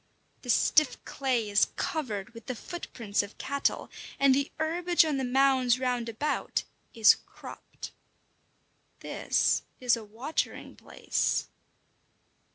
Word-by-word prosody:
The -, -, -11 dB
stiff 305 Hz, -4 st, +4 dB
clay 255 Hz, -5 st, -1 dB
is 205 Hz, 0 st, +3 dB
covered 220 Hz, -, -3 dB
with 230 Hz, -2 st, -12 dB
the 255 Hz, -, -3 dB
foot 345 Hz, +9 st, -7 dB
prints 210 Hz, -4 st, -1 dB
of 205 Hz, +1 st, -10 dB
cattle, 280 Hz, +1 st, -1 dB, 0.3 s
and 275 Hz, -1 st, +5 dB
the 280 Hz, +2 st, 0 dB
herbage 345 Hz, +2 st, +2 dB
on 300 Hz, -3 st, 0 dB
the 265 Hz, -, -1 dB
mounds 260 Hz, -1 st, +3 dB
round 250 Hz, -2 st, -1 dB
about 285 Hz, +7 st, -1 dB, 0.3 s
is 220 Hz, -2 st, +7 dB
cropped. -, -, -10 dB, 1.1 s
This -, -, +1 dB, 0.2 s
is 250 Hz, -2 st, +3 dB
a 230 Hz, -, -8 dB
watering 230 Hz, +9 st, -4 dB
place. -, -, -1 dB
255 Hz, 125 wpm, -29 LUFS, 230-280 Hz, 1.1 s, is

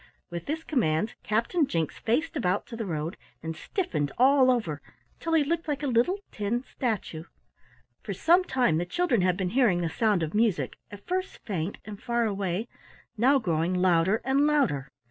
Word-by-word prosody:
With 170 Hz, -1 st, -6 dB
this 320 Hz, +2 st, -2 dB
command, 215 Hz, -, 0 dB
Captain 235 Hz, -, +1 dB
Jinks 165 Hz, -, -2 dB
faced 305 Hz, +9 st, 0 dB
about 180 Hz, +2 st, 0 dB
to 230 Hz, -, -9 dB
the 225 Hz, -2 st, -4 dB
road, 160 Hz, 0 st, -3 dB, 0.3 s
and 160 Hz, 0 st, -4 dB
stiffened 155 Hz, -, -2 dB
all 260 Hz, +1 st, +5 dB
over 195 Hz, -, 0 dB, 0.4 s
till 330 Hz, -, -2 dB
he 320 Hz, -2 st, +5 dB
looked 330 Hz, +3 st, -2 dB
like 295 Hz, -1 st, -2 dB
a -, -, 0 dB
little 255 Hz, +9 st, +2 dB
tin 220 Hz, +4 st, -2 dB
statue. 210 Hz, -11 st, -3 dB, 0.8 s
For -, -, -6 dB
some 350 Hz, +3 st, +4 dB
time 245 Hz, -, +1 dB
the 175 Hz, -, -1 dB
children 255 Hz, -, +1 dB
had 180 Hz, -1 st, +2 dB
been 190 Hz, -2 st, -1 dB
hearing 220 Hz, -9 st, +3 dB
the 170 Hz, -, -1 dB
sound 210 Hz, -5 st, +1 dB
of 155 Hz, -, -3 dB
music, 215 Hz, -3 st, +1 dB, 0.2 s
at 205 Hz, -1 st, -11 dB
first 370 Hz, +1 st, -3 dB
faint 185 Hz, -2 st, -3 dB
and 205 Hz, -2 st, -9 dB
far 235 Hz, -1 st, 0 dB
away, 200 Hz, 0 st, -2 dB, 0.5 s
now 255 Hz, +6 st, +4 dB
growing 175 Hz, -5 st, 0 dB
louder 180 Hz, +3 st, +3 dB
and 275 Hz, +3 st, +3 dB
louder. 245 Hz, -, +1 dB
220 Hz, 180 wpm, -27 LUFS, 175-270 Hz, 0.8 s, all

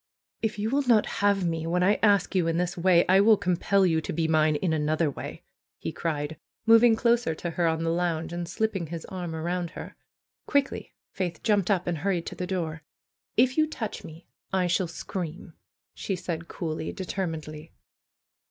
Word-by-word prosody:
^Hf 220 Hz, -1 st, -1 dB
you 215 Hz, +2 st, -1 dB
will 280 Hz, +2 st, +3 dB
not 235 Hz, -6 st, +4 dB, 0.2 s
have 200 Hz, -2 st, +3 dB
me 165 Hz, -1 st, -2 dB
when 180 Hz, +2 st, +1 dB
I 200 Hz, +3 st, +3 dB
ask 200 Hz, -4 st, +3 dB
you 180 Hz, -3 st, +2 dB
in 165 Hz, 0 st, 0 dB
this 175 Hz, +1 st, -1 dB
way, 175 Hz, -1 st, +4 dB
I 190 Hz, +1 st, +6 dB
will 215 Hz, +1 st, +6 dB
compel 190 Hz, +1 st, +2 dB
you 160 Hz, -3 st, +2 dB
to -, -, -5 dB
be 160 Hz, 0 st, 0 dB
mine 155 Hz, -1 st, +3 dB
in 160 Hz, +2 st, 0 dB
another 155 Hz, 0 st, +1 dB
way," -, -, -8 dB, 0.3 s
he -, -, -4 dB
cried, 155 Hz, -2 st, -3 dB, 0.3 s
moving 230 Hz, 0 st, +7 dB
closer 235 Hz, -7 st, +2 dB
to 170 Hz, +2 st, -4 dB
her 170 Hz, +1 st, +1 dB
on 160 Hz, 0 st, 0 dB
the 165 Hz, -, +1 dB
lounge, 170 Hz, -1 st, -1 dB
and 175 Hz, -1 st, -4 dB
slipping 195 Hz, -3 st, -1 dB
his 165 Hz, 0 st, -6 dB
arm 175 Hz, -3 st, -5 dB
around 175 Hz, +2 st, -2 dB
her. -, -, -8 dB, 0.5 s
Quickly 280 Hz, -1 st, -1 dB, 0.2 s
Faith 175 Hz, -3 st, -4 dB
jumped 205 Hz, -5 st, +2 dB
up 185 Hz, -3 st, +2 dB
and 175 Hz, -3 st, -2 dB
hurried 180 Hz, 0 st, -1 dB
to -, -, -5 dB
the 180 Hz, -, -4 dB
door. 165 Hz, -4 st, -3 dB, 0.6 s
''If 255 Hz, +4 st, +4 dB
you 310 Hz, 0 st, +4 dB
touch 230 Hz, -8 st, -5 dB
me 160 Hz, +3 st, -11 dB, 0.3 s
I 190 Hz, -1 st, +2 dB
shall 180 Hz, +1 st, +1 dB
scream," 170 Hz, +1 st, -6 dB, 0.4 s
she 195 Hz, -, -3 dB
said 170 Hz, -2 st, -5 dB
coolly, 160 Hz, -1 st, -4 dB
determinedly. 160 Hz, -5 st, -5 dB
175 Hz, 190 wpm, -27 LUFS, 165-200 Hz, 0.6 s, moving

